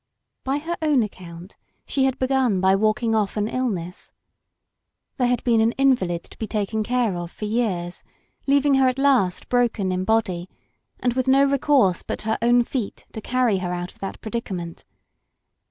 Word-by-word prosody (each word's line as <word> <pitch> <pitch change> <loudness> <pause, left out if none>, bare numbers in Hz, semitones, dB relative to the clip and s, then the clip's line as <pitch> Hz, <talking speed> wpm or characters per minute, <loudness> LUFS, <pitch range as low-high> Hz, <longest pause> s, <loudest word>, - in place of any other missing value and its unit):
By 270 +2 0
her 330 +4 -3
own 285 -8 +2
accoimt 175 -1 -12 0.3
she 270 -1 +1
had 265 0 0
begtin 260 -6 +1
by 190 +1 +4
walk 215 +3 +1
ing 225 -1 +1
off 215 -1 0
an 210 0 0
illness. 205 -8 -3 1.1
There 250 -3 +2
had 245 0 0
been 230 -2 +3
an 225 +1 +2
invahd 195 -11 +2
to - - -16
be 220 - -3
taken 215 0 -1
care 240 -3 0
of 175 -1 -5
for 210 - -7
years, 205 -6 -2 0.5
leaving 280 +1 +3
her 265 -1 +4
at 255 0 0
last 260 -10 +2
broken 235 -6 +1
in 185 0 -1
body, 190 -4 0 0.5
and 245 -1 0
with 255 +1 -1
no 270 +1 +5
recourse 275 - +2
but - - -5
her 220 0 -1
own 240 +1 +4
feet 235 -3 -5
to 220 - -7
carry 245 -4 +1
her 180 -1 -3
out 175 0 -4
of - - -25
that 195 - -6
predica 225 -3 -4
ment. 170 -2 -7
225 Hz, 185 wpm, -23 LUFS, 190-255 Hz, 1.1 s, no